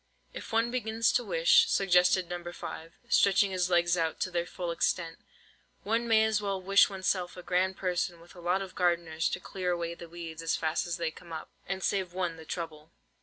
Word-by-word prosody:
"If - - -8
one 230 +1 +2
begins 230 -2 +1
to 245 - +1
wish," - - +4
suggested 180 -1 +3
No. 175 0 -5
5, 165 -1 -8
stretching 195 0 +4
his 180 -1 0
legs 175 -1 +3
out 165 -2 -1
to 185 - -1
their 175 0 -1
full 175 -2 -4
extent, 165 0 -1 0.6
"one 230 +3 0
may 220 -1 +5
as 220 -1 +1
well 200 -2 -2
wish 195 +2 +5
oneself 185 -2 -2
a 180 - -8
grand 185 +2 0
person 180 -2 -1
with 170 +1 -16
a 180 - -12
lot 180 +3 +1
of 185 -1 -10
gardeners 170 -3 +1
to - - -3
clear 185 0 -4
away 170 -1 -1
the 170 0 -11
weeds 165 -1 -7
as 165 0 0
fast 160 +2 -1
as 170 - -2
they 165 -2 -2
come 170 +1 -14
up, 160 - -7 0.2
and 190 0 -3
save 190 -3 0
one 180 -2 -2
the 160 - -11
trouble." 160 -2 -6
180 Hz, 210 wpm, -30 LUFS, 170-195 Hz, 0.6 s, may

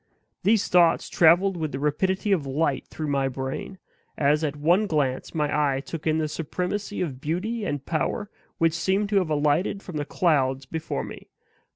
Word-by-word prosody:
These 215 0 +3
thoughts 175 -2 +4
traveled 175 +4 +4
with 155 -3 -3
the - - -2
rapidity 190 +8 0
of 160 -8 +1
light 140 0 0
through 155 -2 -5
my 135 -1 +1
brain, 135 +8 -5 0.4
as 150 +2 +2
at 150 -2 -1
one 175 +8 +2
glance 145 -6 -1
my 150 -2 0 0.2
eye - - -1
took 155 +3 -6
in 155 0 +2
the 155 -1 0
supremacy 180 +7 -3
of 135 -7 -3
beauty 205 +9 -2
and 145 -5 -3
power 165 - -1 0.3
which 165 -1 +2
seemed 195 +4 0
to 205 - +2
have 185 -4 +1
alighted 150 +6 +1
from 175 -5 -6
the 145 - -2
clouds 135 -6 +1
before 160 +4 -4
me. - - -10
160 Hz, 180 wpm, -25 LUFS, 145-185 Hz, 0.4 s, thoughts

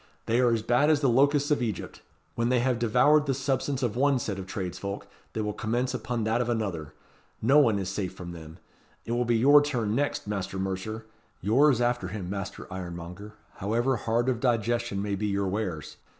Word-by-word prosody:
"They 115 +2 +2
are 125 -2 +4
as 115 -2 0
bad 120 +6 +3
as 150 -2 +3
the 135 - +3
locusts 140 +4 +3
of 145 - +2
Egypt. 110 -6 -4 0.3
When 115 +1 0
they 125 - +3
have 125 0 +1
devoured 145 +6 +4
the 135 - +1
substance 135 0 -1
of 120 -3 0
one 140 +2 +3
set 100 -5 -3
of 95 - -7
tradesfolk 95 +1 -5 0.3
they 110 - -2
will 105 0 -2
commence 120 +5 -1
upon 120 -1 -2
that 110 +2 +1
of 120 - -2
another. 100 -10 -3 0.4
No 135 +7 +5
one 115 -8 +4
is 95 -2 -3
safe 95 -1 -3
from 90 -1 -8
them. 80 -1 -10 0.5
It - - -5
will 120 +1 +1
be 120 -1 +2
your 145 +5 +7
turn 120 -8 -1
next, 145 +4 -1
Master 100 -2 -3
Mercer. 95 +4 -4 0.3
Yours 125 +6 +4
after 120 -5 0
him, 95 -2 -5
Master 100 0 -5
Ironmonger, 90 +3 -7 0.2
however 120 +7 +1
hard 115 +3 0
of 125 -3 +1
digestion 120 -4 0
may 105 -1 -2
be 105 +2 -1
your 100 -1 0
wares. 95 -6 -3
115 Hz, 200 wpm, -27 LUFS, 100-125 Hz, 0.5 s, your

